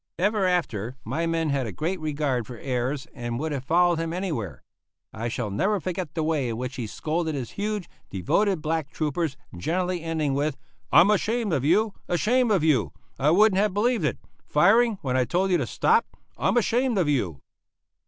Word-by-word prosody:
Ever 200 Hz, +1 st, +2 dB
after 130 Hz, -, -1 dB
my 155 Hz, +9 st, -1 dB
men 165 Hz, -2 st, 0 dB
had 135 Hz, -3 st, 0 dB
a -, -, -4 dB
great 170 Hz, -, -2 dB
regard 145 Hz, -6 st, -1 dB
for 125 Hz, -, -8 dB
Ayres, 130 Hz, +2 st, -2 dB
and 120 Hz, -2 st, -4 dB
would 155 Hz, +4 st, -2 dB
have 140 Hz, -3 st, -3 dB
followed 175 Hz, +3 st, +3 dB
him 165 Hz, 0 st, -2 dB
anywhere. 165 Hz, -, -4 dB, 0.5 s
I 115 Hz, +2 st, -3 dB
shall 115 Hz, -2 st, -3 dB
never 195 Hz, -, +1 dB
forget 175 Hz, -3 st, -4 dB
the 160 Hz, -, 0 dB
way 155 Hz, -5 st, 0 dB
in 115 Hz, -, -3 dB
which 125 Hz, +2 st, -5 dB
he 120 Hz, -4 st, -3 dB
scolded 160 Hz, +6 st, -2 dB
his 130 Hz, -4 st, -4 dB
huge, 210 Hz, -2 st, -3 dB, 0.2 s
devoted 175 Hz, -, 0 dB
black 155 Hz, -2 st, -1 dB
troopers, 155 Hz, -2 st, -2 dB, 0.2 s
generally 180 Hz, -, -1 dB
ending 160 Hz, -3 st, -1 dB
with 145 Hz, +1 st, -1 dB, 0.3 s
"I'm 180 Hz, +5 st, +7 dB
ashamed 215 Hz, 0 st, 0 dB
of 135 Hz, -, 0 dB
you, 200 Hz, +8 st, +3 dB
ashamed 235 Hz, +8 st, +2 dB
of 195 Hz, -7 st, +2 dB
you! 125 Hz, -, +2 dB, 0.3 s
I 145 Hz, -, +3 dB
wouldn't 195 Hz, +3 st, +5 dB
have 205 Hz, -2 st, +1 dB
believed 230 Hz, -1 st, +1 dB
it! 150 Hz, -, 0 dB, 0.3 s
Firing; 215 Hz, +8 st, +4 dB
when 130 Hz, -2 st, -1 dB
I 130 Hz, -, +3 dB
told 185 Hz, +8 st, 0 dB
you 180 Hz, -, +4 dB
to 130 Hz, -, -2 dB
stop! 455 Hz, -, +2 dB, 0.3 s
I'm -, -, +1 dB
ashamed 240 Hz, +1 st, +2 dB
of 180 Hz, -5 st, +2 dB
you!" 100 Hz, -, 0 dB
160 Hz, 190 wpm, -25 LUFS, 130-190 Hz, 0.5 s, I'm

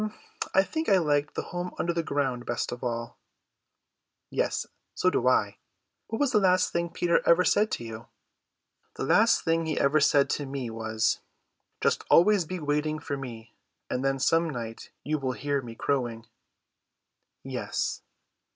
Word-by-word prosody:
"I 190 Hz, -, +6 dB
think 320 Hz, +9 st, -3 dB
I 195 Hz, -, +6 dB
liked 145 Hz, -4 st, +1 dB
the -, -, -2 dB
home 175 Hz, 0 st, -5 dB
under 170 Hz, -, 0 dB
the 170 Hz, -, 0 dB
ground 135 Hz, -5 st, -1 dB
best 120 Hz, -, -2 dB
of 120 Hz, -, -7 dB
all." 115 Hz, -1 st, -4 dB, 1.1 s
"Yes, -, -, 0 dB, 0.3 s
so 185 Hz, -, +2 dB
do 125 Hz, -, +1 dB
I. 105 Hz, -5 st, +2 dB, 0.5 s
What 225 Hz, -, -3 dB
was 285 Hz, -3 st, +2 dB
the 215 Hz, -, +4 dB
last 185 Hz, -2 st, +3 dB
thing 170 Hz, 0 st, -1 dB
Peter 170 Hz, 0 st, +1 dB
ever 175 Hz, +2 st, +4 dB
said 215 Hz, +1 st, +3 dB
to -, -, -3 dB
you?" 115 Hz, 0 st, -8 dB, 0.9 s
"The -, -, -4 dB
last -, -, +4 dB
thing 165 Hz, 0 st, +1 dB
he 155 Hz, -, -1 dB
ever 140 Hz, +2 st, +3 dB
said 140 Hz, -1 st, +4 dB
to 145 Hz, -, -2 dB
me 135 Hz, -4 st, -4 dB
was, 110 Hz, 0 st, 0 dB, 0.6 s
'Just -, -, +1 dB
always 195 Hz, 0 st, +5 dB
be 185 Hz, +3 st, -5 dB
waiting 150 Hz, 0 st, 0 dB
for 145 Hz, -1 st, -4 dB
me, 120 Hz, -4 st, -8 dB, 0.4 s
and 125 Hz, +1 st, -1 dB
then 135 Hz, 0 st, +1 dB
some 165 Hz, +5 st, +2 dB
night 115 Hz, -5 st, -6 dB
you 155 Hz, +1 st, -1 dB
will 130 Hz, -2 st, -1 dB
hear 140 Hz, +1 st, -1 dB
me 115 Hz, -2 st, -9 dB
crowing.'" 120 Hz, -4 st, -1 dB, 1.2 s
"Yes." -, -, -3 dB
145 Hz, 165 wpm, -27 LUFS, 120-170 Hz, 1.2 s, I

